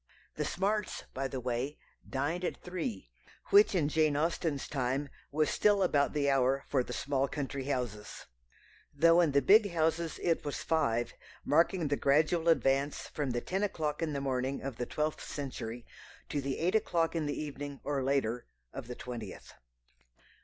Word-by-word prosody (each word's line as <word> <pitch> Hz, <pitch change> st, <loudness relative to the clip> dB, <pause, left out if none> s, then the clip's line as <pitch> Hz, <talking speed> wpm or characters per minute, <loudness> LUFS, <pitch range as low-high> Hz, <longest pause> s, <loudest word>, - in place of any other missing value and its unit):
The -, -, -2 dB
Smarts, 205 Hz, +3 st, -1 dB
by 135 Hz, +1 st, -2 dB
the 135 Hz, 0 st, -4 dB
way, 125 Hz, +4 st, -2 dB, 0.3 s
dined 150 Hz, +6 st, -1 dB
at -, -, -2 dB
three, 155 Hz, -, -4 dB, 0.4 s
which 205 Hz, 0 st, +7 dB
in 160 Hz, -5 st, +2 dB
Jane 155 Hz, -1 st, +2 dB
Austen's 160 Hz, -2 st, -1 dB
time 135 Hz, +1 st, -1 dB, 0.2 s
was 155 Hz, +1 st, +1 dB
still 205 Hz, -2 st, +3 dB
about 145 Hz, -5 st, +2 dB
the 145 Hz, -2 st, +1 dB
hour 135 Hz, 0 st, +2 dB
for 130 Hz, -3 st, +2 dB
the -, -, -8 dB
small 140 Hz, -1 st, 0 dB
country 140 Hz, -2 st, -4 dB
houses, 120 Hz, -7 st, -4 dB, 0.7 s
though 165 Hz, +4 st, +6 dB
in 165 Hz, -4 st, +3 dB
the 140 Hz, -1 st, +3 dB
big 205 Hz, -, +6 dB
houses 165 Hz, 0 st, 0 dB
it 165 Hz, -1 st, +1 dB
was 145 Hz, -, -4 dB
five, 120 Hz, -8 st, +1 dB, 0.3 s
marking 165 Hz, +2 st, +3 dB
the 145 Hz, 0 st, 0 dB
gradual 155 Hz, +4 st, +3 dB
advance 140 Hz, -2 st, +2 dB
from 145 Hz, -3 st, -2 dB
the 120 Hz, -1 st, -1 dB
ten 190 Hz, +2 st, -2 dB
o'clock 155 Hz, -7 st, -1 dB
in 160 Hz, -2 st, -1 dB
the 140 Hz, -, -2 dB
morning 135 Hz, 0 st, -1 dB
of 135 Hz, -4 st, -5 dB
the 125 Hz, -, -3 dB
twelfth 155 Hz, 0 st, -2 dB
century 120 Hz, -4 st, -5 dB, 0.4 s
to 145 Hz, -, -1 dB
the 135 Hz, 0 st, -2 dB
eight 175 Hz, +4 st, +1 dB
o'clock 175 Hz, -7 st, +1 dB
in 160 Hz, -3 st, 0 dB
the 145 Hz, -, -2 dB
evening 145 Hz, -1 st, -5 dB
or 140 Hz, -1 st, -1 dB
later 130 Hz, -3 st, 0 dB, 0.3 s
of -, -, -7 dB
the 125 Hz, -, -6 dB
twentieth. 115 Hz, -6 st, -8 dB
145 Hz, 170 wpm, -32 LUFS, 135-165 Hz, 0.7 s, which